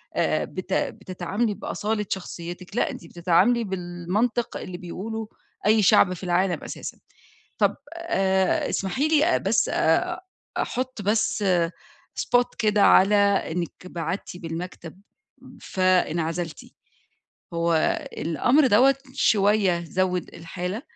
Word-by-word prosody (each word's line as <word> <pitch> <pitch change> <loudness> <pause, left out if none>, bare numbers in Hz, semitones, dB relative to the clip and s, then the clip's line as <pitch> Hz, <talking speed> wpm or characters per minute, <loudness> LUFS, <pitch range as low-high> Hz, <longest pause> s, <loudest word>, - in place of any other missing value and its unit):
آآ - - +1
بت - - -6
بتتعاملي 195 +5 -2
بأصالة 210 +1 -2
شخصيتِك، 175 0 -6
لأ، - - +1
أنتِ 170 - -9
بتتعاملي 180 +8 +2
بالمنطق 190 +5 -2
اللي 185 -1 -7
بيقوله 215 +5 -6 0.4
أي 215 +1 +5
شعب 185 0 +5
في 180 - -9
العالم 180 0 0
أساسًا. - - -7 0.6
طَب - - +2 0.2
آآ 190 - +1
اسمحي 205 +10 0
لي 315 +2 +3
بس - - +1
آآ 360 0 +1 0.4
أحط 255 -3 -3
بس 210 +1 +1 0.8
spot 245 0 +1
كده 210 -2 +3
على 195 +2 +6 0.4
إنِك 170 0 -2 0.2
بعدتِ 175 +1 -4
بالمكتب 170 +1 -7 0.6
فانعزلتِ، 170 -3 0 0.9
هو 170 0 +1 0.4
الأمر 245 - +2
دوّة 255 +5 +5 0.2
شوية 200 -6 +2
زوّد 180 +1 -1
الحالة، 180 +6 -5
190 Hz, 105 wpm, -24 LUFS, 175-220 Hz, 0.9 s, على